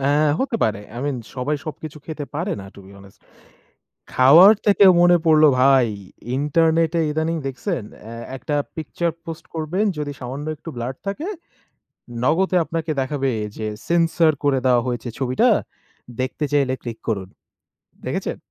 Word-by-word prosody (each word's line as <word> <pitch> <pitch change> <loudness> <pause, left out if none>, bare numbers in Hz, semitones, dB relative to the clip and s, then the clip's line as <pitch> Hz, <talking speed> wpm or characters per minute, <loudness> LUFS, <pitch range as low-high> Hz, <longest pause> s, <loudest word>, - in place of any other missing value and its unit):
অ্যা 135 - +1 0.3
হতে 265 -3 0
পারে, 105 -2 -1 0.2
I - - -4
mean 140 -3 -1 0.2
সবাই 140 +4 -1
সবকিছু 155 0 -7
খেতে 155 -2 -5
পারে 175 +7 -2
না 95 - -10
টু - - -14
বি 95 - -14
অনেস্ট। 100 0 -18 0.9
খাওয়ার 160 +11 +8
থেকে 205 0 +5 0.2
মনে 175 0 +6
পড়ল 155 -1 +5 0.2
ভাই 135 -2 +5 0.5
ইন্টারনেটে 165 +3 +2
ইদানিং 160 +2 -1
দেখছেন 135 - -3 0.2
অ্যা 115 +2 -9 0.2
একটা 135 +3 -4 0.2
পিকচার 170 +2 -2
পোস্ট 165 -1 -8
করবেন 160 +6 -1
যদি 145 -1 -3
সামান্য 135 +4 -6
একটু 155 - -12
ব্লাড 120 +2 -4
থাকে। 290 - -3 0.9
নগদে 180 +7 +2
আপনাকে 165 0 -4
দেখাবে 135 0 -1 0.3
যে 110 - -4 0.2
সেন্সর 165 -1 +3
করে 140 -2 +3
দেওয়া 125 -2 +4
হয়েছে 120 0 -3
ছবিটা, 130 -1 +2 0.7
দেখতে 130 +4 -2
চাইলে 140 -3 +2
ক্লিক 115 -2 -6
করুন। 100 -4 -2 0.8
দেখেছেন? - - -3
150 Hz, 145 wpm, -21 LUFS, 130-165 Hz, 0.9 s, খাওয়ার